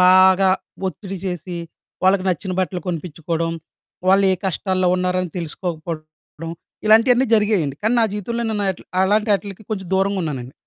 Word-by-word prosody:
బాగా 185 +1 +6 0.4
ఒత్తిడి 195 +1 -5
చేసి, 180 -1 -4 0.5
వాళ్ళకి 190 0 +3
నచ్చిన 185 +1 -1
బట్టలు 185 -1 -2
కొనిపించుకోడం, 165 -1 -2 0.6
వాళ్ళు 195 +1 +5
ఏ - - +3
కష్టాల్లో 185 0 +1
ఉన్నారని 180 -1 0
తెలుసుకోకపోవడం 165 -1 -6 0.3
ఇలాంటియన్నీ 240 +4 +5
జరిగాయండి. 205 -10 +2
కానీ 220 +3 +2
నా - - +5
జీవితంలో 230 +3 -3
నేను 210 -2 -1
అట్లీ 175 - -15 0.2
అలాంటాటిల్కి 205 0 +1
కొంచెం 190 -3 -3
దూరంగా 195 +1 +1
ఉన్నానండి. 135 -5 -4
185 Hz, 130 wpm, -21 LUFS, 170-200 Hz, 0.6 s, బాగా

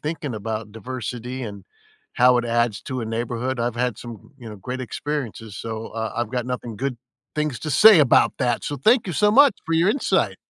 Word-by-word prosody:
thinking 150 -3 -4
about 110 0 -5
diversity 125 +2 -6
and 100 -5 -7 0.5
how 125 0 +5
it 120 - -1
adds 120 -2 0
to 130 -2 -4
a - - -3
neighborhood. 120 +3 -3
I've 120 0 -1
had 125 -3 -1
some, 120 -3 -10
you 120 -3 -10
know, 105 - -8
great 125 +7 -6
experiences, 120 -5 -5
so, 110 +1 -5
uh, 110 0 -4
I've 120 -2 -2
got 125 -1 -2
nothing 125 -3 -5
good 130 +1 -3 0.4
things 150 -4 -1
to 155 - -4
say 210 +6 +8
about 140 -5 +4
that, 120 -1 0
so 145 - -3
thank 220 - +3
you 180 - -3
so 210 +7 +3
much 275 +1 +6
for 165 - 0
your 170 +5 +4
insight! 280 - 0
125 Hz, 205 wpm, -23 LUFS, 115-145 Hz, 0.5 s, say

